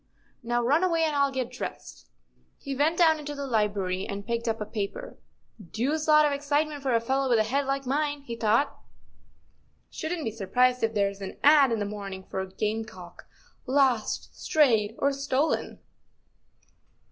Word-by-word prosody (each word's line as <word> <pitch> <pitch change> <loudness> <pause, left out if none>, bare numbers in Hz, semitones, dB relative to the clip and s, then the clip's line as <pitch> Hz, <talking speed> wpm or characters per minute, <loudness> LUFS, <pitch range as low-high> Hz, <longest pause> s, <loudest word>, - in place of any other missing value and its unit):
Now, 240 0 -1
run 290 +9 +3
away, 335 -3 +2
and 310 -2 0
I'll 280 -1 +2
get 255 -2 -3
dressed." - - -8 0.5
He 275 -1 -5
went 310 +5 +1
down 320 -3 +4
into 295 0 -6
the 280 0 -4
library 205 -6 -1
and 200 0 -5
picked 235 0 -2
up 225 0 -1
a 210 - -3
paper. 215 - -5 0.2
" 190 -7 -19
Deuced 300 +6 0
lot 305 0 +6
of 295 - +2
excitement 290 +1 -1
for 265 -3 +1
a - - +4
fellow 265 +3 0
with 235 - +4
a 220 - +3
head 270 +5 -1
like 275 0 -1
mine," 290 +2 -1
he 235 -4 -6
thought. 230 +5 +1 0.5
" 75 -1 -40
Shouldn't 320 0 -4
be 225 - -1
sur¬ 205 -3 -8
prised 250 0 +3
if 225 0 0
there's 200 -1 0
an 190 - -7
ad. 285 -3 +6
in 230 - +1
this 205 -1 -2
morning 200 -2 -7
for 190 - -4
a 190 - -5
game¬ 215 +3 -3
cock 180 -5 -13 0.2
* - - -35
lost, 255 -6 +1
strayed—or 250 -2 +2
stolen. 275 +2 -1
245 Hz, 185 wpm, -27 LUFS, 210-285 Hz, 0.5 s, lot